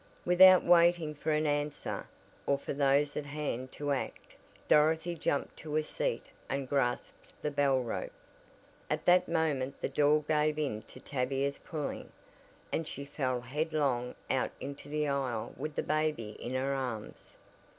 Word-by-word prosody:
Without 185 +1 +8
waiting 170 -2 +4
for 150 +2 -4
an 155 0 +2
answer, 145 0 -2 0.4
or 140 - +3
for 140 - -5
those 140 +1 +2
at 145 - -3
hand 140 -3 -3
to 145 -1 -2
act, 135 - -4 0.3
Dorothy 160 +3 +4
jumped 145 -3 -1
to 155 -1 -5
a 155 - +2
seat - - -3 0.2
and 135 -1 -2
grasped 125 -3 -2
the 150 - -2
bell 140 -2 +3
rope. - - -4 0.8
At - - -1
that 180 0 +5
moment 145 -5 0
the - - -2
door 150 +2 +3
gave 150 0 +1
in 135 -8 -1
to - - -12
Tavia's 135 +1 -1
pulling, 155 -4 -5 0.6
and 160 - -1
she 140 - -5
fell 130 -3 -2
headlong 140 -2 -1 0.2
out - - +1
into 140 +1 -7
the 150 0 0
aisle 135 -5 -2
with 150 +3 -5
the - - 0
baby 155 -8 0
in 125 +2 -4
her 135 +2 0
arms. 125 -6 -5
145 Hz, 155 wpm, -31 LUFS, 135-155 Hz, 0.8 s, Without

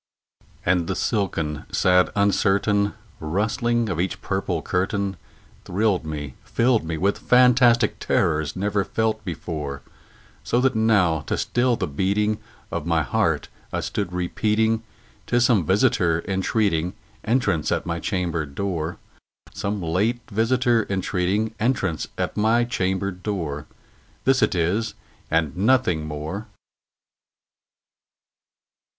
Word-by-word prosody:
And 90 -1 +2
the - - -1
silken 85 - -1
sad 90 0 +4
uncertain 100 0 +2 0.2
rustling 110 +8 0
of 90 -5 -2
each 95 - -2
purple 95 -4 -2
curtain 95 +1 -1 0.5
Thrilled 95 -3 0
me 75 -4 -5
filled 120 -3 +2
me 80 0 -3
with 100 +5 +1
fantastic 125 -2 +4
terrors 80 -2 +1
never 100 +1 0
felt 110 +1 -1
before; 75 -6 -5 0.6
So 120 - +1
that 130 0 +3
now, 105 -8 +3
to - - 0
still 120 0 +1
the - - -2
beating 100 +8 0 0.3
of 75 - -3
my 80 -2 +2
heart, 60 - 0 0.2
I - - -1
stood 100 -3 -3
repeating 110 +5 +1 0.5
"'Tis 120 0 +3
some 105 -10 +3
visitor 95 -6 +2
entreating 95 -2 0 0.3
entrance 105 - +1
at - - 0
my 85 0 -2
chamber 85 -4 -1
door 85 +2 -3 0.6
Some 100 -1 -3
late 105 +9 0
visitor 115 +1 +2
entreating 100 +3 0
entrance 100 - 0
at - - -2
my 110 +3 +3
chamber 95 -4 -1
door; 90 -6 -4 0.6
This 135 -1 +4
it - - +2
is 95 +7 0 0.3
and 80 -3 +1
nothing 100 -6 +2
more." 75 +9 -5
100 Hz, 120 wpm, -23 LUFS, 85-110 Hz, 0.6 s, sad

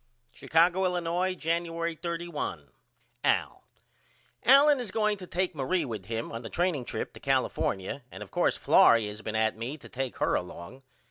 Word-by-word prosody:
Chicago, 175 +3 +2
Illinois, 180 0 0
Januery 170 0 -1
31. 170 - -5 0.5
AL: - - +1 0.8
Allen 280 +2 +7
is 240 -4 -4
going 215 +1 +1
to 185 -2 -10
take 180 +1 -1
Marie 155 +5 0
with 115 -5 -6
him 115 0 -3
on 115 - -5
the 115 - -7
training 170 -7 0
trip - - -4
to - - -12
California 95 +9 -1
and 95 - -7
of 95 - -15
course - - +1
Florrie 115 -2 +5
has 105 +1 -7
been 110 0 -5
at 110 0 +2
me 120 +7 -5
to - - -13
take 135 -1 -4
her - - +1
along. 90 +8 -5
165 Hz, 165 wpm, -28 LUFS, 115-180 Hz, 0.8 s, Allen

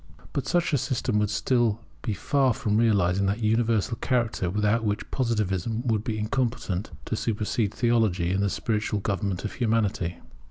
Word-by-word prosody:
But 140 - -2
such 175 -2 +1
a 140 - +3
system 130 -4 0
would 105 -1 +1
still 115 0 +1 0.2
be 110 -4 -2
far 135 +2 +2
from 105 -1 0
realizing 100 -4 +3
that 105 +4 -1
universal 115 0 +1
character 115 -8 0
without 105 +4 +1
which 105 0 -2
Positivism 110 -2 -1
would 110 -3 +1
be 110 -3 -2
incompetent 110 -3 -1 0.2
to - - -2
supersede 105 -1 -1
Theology 110 -8 +2
in 95 +1 +1
the 100 - +2
spiritual 105 0 -1
government 100 -1 -2
of 105 - -4
Humanity. 110 -7 0
110 Hz, 160 wpm, -26 LUFS, 100-120 Hz, 0.2 s, a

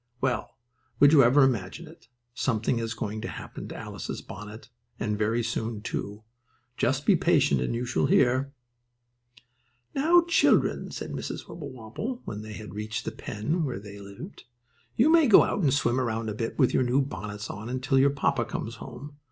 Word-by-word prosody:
Well, 125 -4 -2 0.4
would 145 +2 +7
you 145 - +8
ever 135 +4 +6
imagine 115 -9 -1
it? - - -16 0.3
Something 115 -1 0
is 115 0 -3
going 110 0 -4
to 120 - -4
happen - - -8
to - - -8
Alice's - - -6
bonnet, 105 +3 -9 0.3
and 105 -1 -1
very 110 +3 0
soon, 110 -1 -3
too. 105 -2 -5 0.5
Just 135 +4 0
be 200 - +6
patient 155 -4 +3
and - - -1
you 120 +2 -2
shall 125 +2 +1
hear. 130 +1 +3 1.4
"Now 330 +5 +5
children," 335 -1 +3
said - - -6
Mrs. - - -5
Wibblewobble, 145 - -6
when 105 0 -5
they 110 0 -8
had 105 -4 -9
reached 105 +1 -4
the - - -2
pen 150 +12 -3
where 130 -9 -3
they 100 0 -10
lived, 100 - -10 0.5
"you 275 +8 +4
may 325 -3 +6
go 220 - +8
out - - -1
and 145 -6 +3
swim 125 -2 +1
around 115 -2 -2
a - - -4
bit 115 +2 -4
with 130 -4 +3
your - - +3
new 130 +2 +2
bonnets 105 -2 -6
on 105 +3 -7
until 130 +2 +1
your 140 +1 +5
papa 140 -3 0
comes 115 +1 -5
home. 140 +6 -10
120 Hz, 180 wpm, -27 LUFS, 110-140 Hz, 1.4 s, you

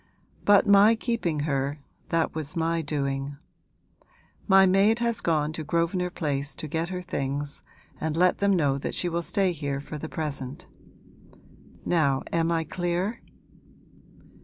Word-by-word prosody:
But 205 -1 +6
my 205 +3 +6
keeping 220 - -1
her 140 -1 -1 0.3
that 165 -1 +1
was 155 -3 -4
my 165 0 0
doing. 140 -2 -3 1.1
My 195 -1 +7
maid 195 +4 +4
has 235 -1 0
gone 155 -2 +1
to 160 - -5
Grosvenor 170 +4 0
Place 145 -4 -3
to 155 - -6
get 165 +3 -2
her 180 -1 -4
things 140 -1 -3 0.4
and 160 0 -2
let 180 +1 +3
them 200 -1 +3
know 140 -5 +1
that - - -4
she 180 - 0
will 170 0 -1
stay 190 +1 +1
here 145 -4 -3
for 150 +2 -7
the 160 - -6
present. 150 +1 -4 1.2
Now 140 -6 +2
am 165 0 +2
I 165 -1 +1
clear?' 175 +6 -2
165 Hz, 145 wpm, -26 LUFS, 145-180 Hz, 1.2 s, My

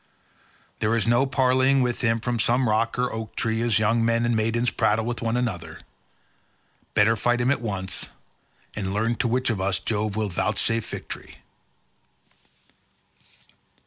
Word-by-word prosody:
There 105 +2 +1
is 115 -1 +1
no 120 +4 +3
parleying 130 0 +3
with 120 -1 -1
him 115 0 +2
from 120 +1 -2
some 120 +3 +2
rock 110 +2 +1
or 125 0 0
oak 110 0 -6
tree 110 0 0
as 115 -2 +2
young 115 +2 +2
men 115 +1 +2
and 120 0 +1
maidens 115 +2 +1
prattle 110 +1 +1
with 120 -1 -3
one 115 +1 0
another. 90 -10 -4 1.1
Better 110 +2 +4
fight 120 +3 +1
him 120 +2 +2
at 140 - 0
once, 95 -5 -3 0.7
and 100 -2 -3
learn 115 +3 +1
to 125 - 0
which 125 +1 +1
of 100 -4 -3
us 95 0 0
Jove 105 -2 -2
will 110 -1 -1
vouchsafe 110 +4 0
victory." - - -8
115 Hz, 155 wpm, -24 LUFS, 110-120 Hz, 1.1 s, Better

